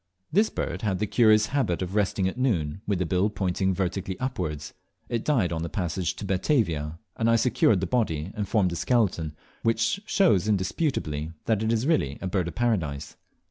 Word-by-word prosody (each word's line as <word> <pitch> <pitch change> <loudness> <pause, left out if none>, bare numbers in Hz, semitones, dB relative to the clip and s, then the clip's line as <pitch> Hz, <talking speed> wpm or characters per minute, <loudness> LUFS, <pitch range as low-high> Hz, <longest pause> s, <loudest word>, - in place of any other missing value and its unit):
This 210 +7 +3
bird - - -3
had 100 -4 0
the 105 - 0
curious 110 0 +4
habit 95 -11 +1
of 90 +1 -5
resting 100 -2 +1
at 95 - -3
noon 95 - 0
with 100 -2 +1
the 90 - 0
bill 90 +5 +1
pointing 95 -1 0
vertically 95 0 -2
upwards. 75 - -3 0.4
It 115 -2 -1
died 110 - +1
on 80 - -2
the 85 - -3
passage 90 0 -2
to 105 - -6
Batavia, 90 - 0 0.2
and 115 0 +2
I 115 - +5
secured 110 -4 +3
the - - 0
body 90 -6 -1
and 105 -2 -3
formed 95 -4 +2
a - - -3
skeleton, 85 -9 0 0.3
which 115 - +1
shows 135 - +3
indisputably 90 - -1
that 110 -2 +1
it 110 0 +1
is 115 +2 +1
really 140 - +1
a - - -6
Bird 90 -2 0
of 85 - -6
Paradise. 85 -13 -1
95 Hz, 190 wpm, -26 LUFS, 85-115 Hz, 0.4 s, I